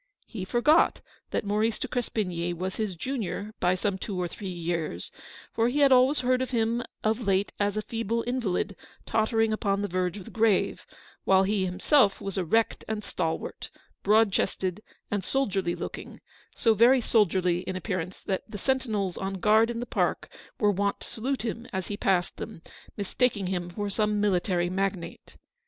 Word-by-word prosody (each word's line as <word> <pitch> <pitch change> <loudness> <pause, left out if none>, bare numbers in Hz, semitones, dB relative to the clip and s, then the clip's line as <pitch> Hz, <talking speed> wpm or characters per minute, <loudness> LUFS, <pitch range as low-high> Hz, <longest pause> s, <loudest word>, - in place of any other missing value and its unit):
He 195 -5 -6
forgot 245 - +4 0.3
that - - -1
Maurice 215 +2 +1
de - - -3
Crespigny 180 -8 -2
was 185 +2 -4
his 215 -4 -2
junior 210 -1 -4
by 180 +1 +3
some 190 +1 -1
two 195 -2 -4
or 180 - 0
three 195 +3 -7
years; 170 - -3 0.4
for 230 - +2
he 290 +4 0
had 280 -1 +6
always 260 +3 +5
heard 255 0 +2
of 260 - -1
him 235 -1 +1 0.2
of 220 +2 +1
late 195 +1 +2
as 205 0 +1
a 215 - -1
feeble 230 +1 -2
invalid 220 -6 -1 0.3
tottering 225 0 +2
upon 200 -1 0
the - - 0
verge 180 +1 -1
of 190 - -9
the - - -10
grave; 220 -3 +1 0.4
while 190 0 +5
he 195 -1 +1
himself 195 +4 +3
was 195 -1 -5
erect 195 +5 +1
and 215 -1 -3
stal 165 -5 -1
wart, - - -8 0.3
broad 215 +1 +4
chested 185 0 -1 0.3
and 205 -2 0
soldierly 195 -10 0
looking; - - -7 0.4
so 225 - +3
very 240 +5 +6
soldierly 185 -6 +2
in 185 +1 -5
appearance 185 -1 -4
that 190 -2 -1
the 205 - -6
sentinels 215 -6 -1
on 195 0 -3
guard 215 +4 +4
in 235 -1 -3
the 240 - -3
park - - -1 0.3
were 210 -4 +4
wont 200 +1 -1
to - - -8
salute 260 +4 -3
him 235 +1 -4
as 190 -2 -3
he 205 - -2
passed 190 -3 +1
them, 165 - -8 0.3
mistaking 205 0 0
him 180 -1 -2
for 205 +4 -3
some 210 +1 0
military 180 -3 +1
magnate. 190 -1 -3
205 Hz, 180 wpm, -27 LUFS, 185-225 Hz, 0.4 s, had